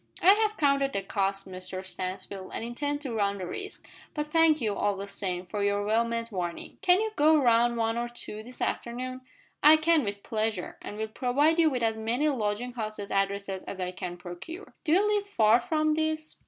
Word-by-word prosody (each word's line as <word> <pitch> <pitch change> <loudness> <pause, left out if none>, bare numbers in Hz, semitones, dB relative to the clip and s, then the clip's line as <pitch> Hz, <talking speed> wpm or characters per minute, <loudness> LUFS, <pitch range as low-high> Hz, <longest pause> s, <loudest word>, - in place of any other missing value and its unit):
"I 380 +3 +9
have 430 0 +1
counted 275 -2 +2
the 195 - -1
cost, 195 0 -1
Mr 185 0 -6
Stansfield, 185 +1 -4
and - - -3
intend 285 +5 -2
to 265 -6 -4
run 200 -2 0
the 185 - -4
risk; 400 - -6 0.3
but 300 -1 -1
thank 325 -1 +5
you, 220 -5 0
all 200 0 0
the 200 - -4
same, 190 -3 -4
for 205 +3 -3
your 205 0 +1
well 220 +2 +3
meant 230 0 -3
warning. 175 -3 -5
Can 370 -2 +5
you 440 0 -1
go 310 0 +5
round 235 -3 +3
one 225 0 0
or 240 0 -2
two 215 -3 -7
this 250 +3 -12
afternoon?" 255 +2 -3 0.4
"I 305 +2 +8
can, 315 -1 +3
with 200 -1 -4
pleasure, 215 -4 -2
and 205 - -7
will 220 0 -2
provide 280 +8 +2
you 325 -1 +6
with 250 -4 -2
as 225 -1 +1
many 235 +7 0
lodging 240 -1 -2
house 215 -3 -4
addresses 195 -1 -2
as 190 - -7
I 180 -1 -2
can 180 -1 -6
procure. 180 - -9
Do 310 - +1
you 390 +5 +4
live 415 -1 0
far 225 - +4
from 310 +2 +1
this?" 315 0 -1
230 Hz, 210 wpm, -28 LUFS, 200-300 Hz, 0.4 s, I